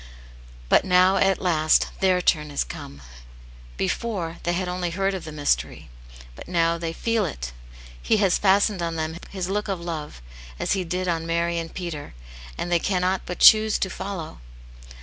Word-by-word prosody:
" - - -20
But - - +4
now, 185 +1 +4
at 195 -1 +2
last, 155 -3 +3
their 185 -2 +2
turn 150 -4 +2
is 145 - -1
come. 70 0 -9 0.7
Before, 170 - -2
they 175 - -1
had 180 +1 -2
only 180 0 -2
heard 195 +3 -1
of 185 -3 -5
the 155 - -7
mystery, 145 - -1 0.4
but - - -11
now 170 -1 +1
they 165 -1 -3
feel 230 +5 0
it. - - -4 0.5
He 220 - +2
has 195 -3 +2
fastened 200 -1 +3
on 165 -1 -2
them 160 +1 -3
His 185 -3 -4
look 205 +2 -2
of 195 -3 -2
love, 160 - -6 0.4
as - - -2
He 190 -2 +1
did 180 +2 -3
on 165 -1 -1
Mary 170 0 0
and 165 0 -6
Peter, 165 - -6 0.4
and 175 - -4
they 175 - +4
cannot 185 +1 0
but 180 - -4
choose 215 0 +7
to 190 - -2
follow. 180 - -6
175 Hz, 180 wpm, -24 LUFS, 165-190 Hz, 0.7 s, choose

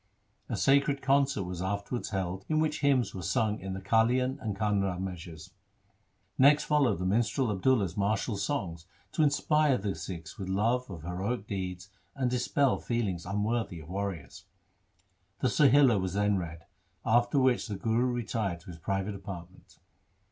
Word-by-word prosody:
A - - -2
sacred 140 +1 +3
concert 135 -5 +2
was 90 -1 -5
afterwards 100 +5 -3
held 95 -1 -3
in 155 0 +2
which 155 -1 0
hymns 135 -4 +2
were 95 - -6
sung 110 +4 0
in 95 0 -5
the 95 - -4
Kalian 120 +6 +2
and 105 -5 -3
Kanra 100 -3 0
measures. 85 -4 -7 0.9
Next 145 +3 +6
followed 140 - +2
the 90 - -3
minstrel 115 +5 +1
Ab 95 -2 -4
dulla's 105 -10 +2
martial 105 +2 0
songs 85 -4 -3 0.2
to - - 0
inspire 150 -1 +3
the 100 0 -2
Sikhs 85 +2 -8
with 95 -1 -4
love 115 +6 +1
of 85 -5 -8
heroic 95 +6 -3
deeds 95 -2 -5 0.2
and 130 -3 0
dispel 125 +2 +1
feelings 100 -8 -2
unworthy 105 -2 -1
of 80 0 -12
warriors. 95 -3 -5 0.9
The 130 - +2
Sohila 135 -5 +5
was 95 0 -3
then 105 0 +2
read, 85 -1 -7 0.4
after 120 +4 +3
which 130 -2 +3
the 105 - -4
Guru 115 +5 +1
retired 110 -7 -2
to 90 - -10
his 80 - -11
private 95 +4 -2
apartment. 95 -2 -10
105 Hz, 160 wpm, -29 LUFS, 95-125 Hz, 0.9 s, Next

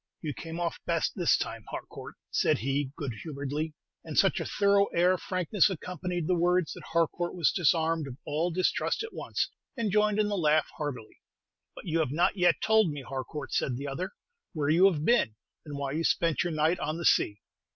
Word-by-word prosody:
"You 150 -2 -2
came 165 +3 -7
off 170 -1 -2
best - - +1
this - - +3
time, - - -4
Harcourt," - - -8 0.2
said - - +2
he, 135 +4 -1
good 140 -5 -3
humoredly; 150 +1 -4 0.3
and - - -6
such - - +4
a - - -3
thorough 200 0 +3
air 175 +2 +4
of 185 - -1
frankness 185 +2 +2
accompanied 180 -1 -4
the 180 - +2
words 175 0 +2
that - - -10
Harcourt 170 +1 0
was 170 -4 +3
disarmed 165 -2 +2
of 130 -1 -8
all 155 +4 0
distrust 180 - 0
at 450 - -7
once, - - -2 0.3
and 225 -4 0
joined 210 0 +3
in 210 -1 +2
the 205 - -1
laugh 155 -4 +2
heartily. 130 -7 -6 0.5
"But - - -10
you 165 -1 0
have 155 - +1
not 175 +7 +2
yet 175 -3 +3
told 220 -4 +4
me, 145 -2 -5
Harcourt," 135 +4 -6
said 125 -2 0
the 140 +2 -5
other, 180 +8 -4 0.4
"where 150 -4 -1
you 180 +5 +6
have 155 -3 -3
been, 185 - +3 0.3
and 145 -1 -5
why 140 -1 -3
you 160 +3 -1
spent 165 -4 +2
your 175 - -2
night 155 +3 +2
on 155 -1 -2
the 170 - -4
sea." 105 0 +3
165 Hz, 205 wpm, -29 LUFS, 145-180 Hz, 0.5 s, you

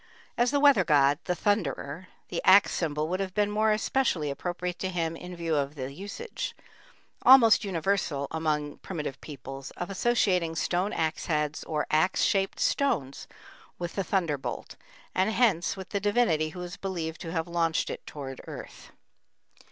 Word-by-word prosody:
As 240 +1 +3
the 285 - +1
weather 280 -9 +6
god, 145 -3 +4
the 180 - 0
thunderer, 175 - -1 0.2
the 175 - -2
axe 195 +2 +7
symbol 155 -2 -1
would 185 +3 -2
have 190 -2 -3
been 205 -1 +2
more 215 +1 +2
especially 215 - +1
appropriate 175 +4 -4
to 190 - -2
him 165 -3 -2
in 180 +2 -8
view 165 -2 -1
of 140 0 -1
the 135 -1 -5
usage, 205 - -6 0.7
almost 235 -5 +7
universal 170 -6 -1
among 150 -2 -1
primitive 155 -7 -5
peoples, 135 -2 -8
of 175 +2 -4
associating 185 -6 +1
stone 180 +5 0
axe 160 -1 -2
heads 150 -2 -1
or 150 -2 -1
axe 160 +5 +3
shaped 195 -1 +1
stones 145 - 0 0.5
with 175 -1 -4
the 195 - -1
thunderbolt, 165 -8 -2 0.4
and 190 +3 +2
hence 215 -7 +2
with 190 -1 -8
the 200 - -1
divinity 200 -7 +2
who 180 +3 -9
was 180 +1 -7
believed 170 -4 -4
to 165 -2 -5
have 165 0 -2
launched 165 -2 0
it - - -7
toward 135 -3 -7
the - - -14
earth. - - -10
175 Hz, 165 wpm, -28 LUFS, 155-195 Hz, 0.7 s, axe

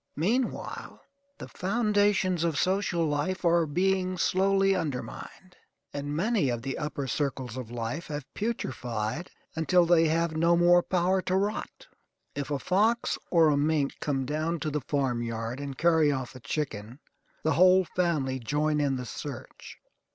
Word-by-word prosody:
Meanwhile 230 - -2 0.4
the - - -8
foundations 205 -3 +1
of 165 -4 0
social 185 -2 +1
life 155 +5 -1
are 170 -1 +3
being 185 +3 0
slowly 195 +2 +2
undermined; 175 +3 -5 0.4
and 145 +1 -4
many 195 - +1
of 120 -1 -3
the 135 - -3
upper 150 -2 -3
circles 130 -1 -2
of 125 -3 -6
life 120 +7 -4
have 145 -3 -5
putrefied 125 - -3 0.3
until 170 +2 +3
they 165 -1 +4
have 165 0 0
no 170 +2 +3
more 175 +1 +6
power 185 +1 +1
to 185 0 -1
rot. 210 - -2 0.5
If 145 0 -4
a 145 - 0
fox 215 - +1
or 165 -3 +5
a 145 - +2
mink 145 -1 0
come 135 -3 -1
down 155 +4 -2
to 155 - -2
the 150 0 -2
farmyard 120 -3 -2
and 140 -2 -6
carry 160 -2 +4
off 130 -2 -4
a - - -9
chicken, 125 -4 -4 0.5
the 160 - +2
whole 185 +1 +5
family 155 -8 -1
join 150 +5 0
in 140 -2 +1
the 125 -1 -4
search. 135 +1 -8
160 Hz, 150 wpm, -28 LUFS, 140-185 Hz, 0.5 s, more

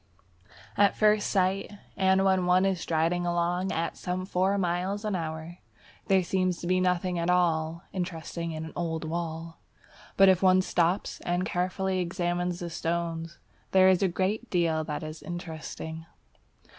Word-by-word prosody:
At 205 0 +4
first 210 -1 +3
sight, 190 0 +1 0.2
and 190 0 +3
when 190 -2 +2
one 180 +1 +4
is 190 -3 0
striding 165 +2 0
along 175 +2 0
at 165 +1 -2
some 180 +1 -3
four 190 +2 +1
miles 185 +3 -1
an 210 -2 0
hour, 160 0 -5 0.5
there 190 -2 +4
seems 185 0 0
to - - -8
be 185 +1 +2
nothing 180 -1 0
at 170 +1 -1
all 170 -1 +1
interesting 170 -2 -4
in 160 0 -5
an 160 - -9
old 160 -2 -2
wall. 165 0 -4 0.6
But 195 - +7
if 185 -2 +5
one 185 -1 +5
stops 175 +2 0
and 175 +1 -1
carefully 185 +1 -1
examines 175 0 -1
the 170 -1 -4
stones, 165 0 -3 0.4
there 190 0 +7
is 185 0 +3
a 195 - +4
great 195 +6 -1
deal 165 -3 +1
that 150 -1 -4
is 155 0 -7
interesting. 160 -2 -7
175 Hz, 155 wpm, -28 LUFS, 165-185 Hz, 0.6 s, But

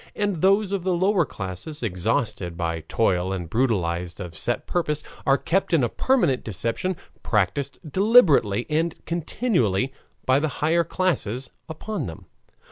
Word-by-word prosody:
And 205 -3 0
those 195 +4 +3
of 195 -3 -1
the 185 -1 +1
lower 185 -1 +3
classes, 95 - -6
exhausted 95 -2 -1
by 85 -1 -1
toil 95 -4 +1
and 90 -3 -3
brutalized 90 -6 0
of 90 -4 -6
set 120 +9 -2
purpose, 150 -4 -1 0.2
are 135 0 +5
kept 170 +2 +1
in 145 - +3
a 120 - +1
permanent 175 - +2
deception, 115 - -2 0.2
practiced 115 +7 0
deliberately 155 - +4
and 160 +2 0
continuously 150 - 0 0.3
by 130 +1 +4
the 155 - 0
higher 165 +3 +2
classes 135 - -1 0.2
upon 160 +1 -4
them. 80 - -9
135 Hz, 140 wpm, -24 LUFS, -, 0.3 s, are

